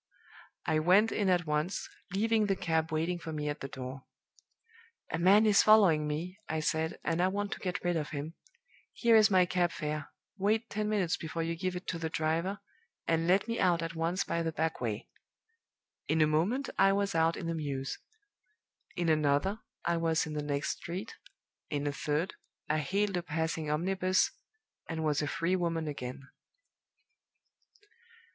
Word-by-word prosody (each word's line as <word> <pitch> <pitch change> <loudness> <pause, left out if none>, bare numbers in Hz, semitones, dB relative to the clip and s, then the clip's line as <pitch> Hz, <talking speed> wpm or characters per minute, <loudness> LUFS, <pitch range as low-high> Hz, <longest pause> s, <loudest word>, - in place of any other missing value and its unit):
I 155 - +2
went 190 +7 +5
in 200 -3 +1
at 175 -2 +2
once, 150 +4 -1 0.2
leaving 215 +2 +2
the 195 - +2
cab 160 -3 0
waiting 165 +3 0
for 165 - -6
me 150 -1 -2
at 145 - -4
the 135 - -5
door. 130 0 -7 1.1
'A 160 - -1
man 200 +5 +6
is 210 -2 +6
following 190 -9 +5
me,' 170 +6 -4
I 160 - 0
said, 160 +1 -1
'and 165 +1 0
I 180 - +4
want 205 +1 -2
to - - -4
get 180 -2 -3
rid 175 -1 +1
of 155 -2 -2
him. 150 +2 -5 0.6
Here 235 -2 +4
is 215 0 +7
my 185 -2 +5
cab 175 -1 +1
fare; 150 -1 -4 0.3
wait 220 +4 +1
ten 210 0 -1
minutes 195 -6 +1
before 165 +1 -4
you 165 +1 -2
give 180 +2 -2
it 180 - -6
to 165 - -2
the 160 -1 -2
driver, 165 +6 -1 0.5
and 165 0 +1
let 190 +4 +3
me 230 0 -2
out 170 -2 +3
at 165 +1 -4
once 165 +3 0
by 170 - -1
the 165 -1 -1
back 160 -2 -2
way!' 110 -3 -3 1.0
In 160 - +1
a 155 - +6
moment 180 - +1
I 195 0 +6
was 200 0 0
out 165 0 +2
in - - -5
the 165 - -1
mews; 140 -4 -3 1.0
in 175 -1 -1
another, 155 +6 +2 0.3
I 170 0 +2
was 165 -1 +1
in 155 - -6
the 150 - -2
next 145 0 -2
street; 185 +6 -6 0.6
in 145 0 -2
a 145 - +1
third, 150 +4 -1 0.3
I 155 +1 +1
hailed 195 +4 0
a - - 0
passing 160 -1 -2
omnibus, 185 +4 +1 0.6
and 160 -1 -2
was 150 -1 +1
a 150 - -1
free 170 +5 0
woman 165 -3 -1
again. 135 -1 -6
165 Hz, 180 wpm, -31 LUFS, 155-190 Hz, 1.1 s, is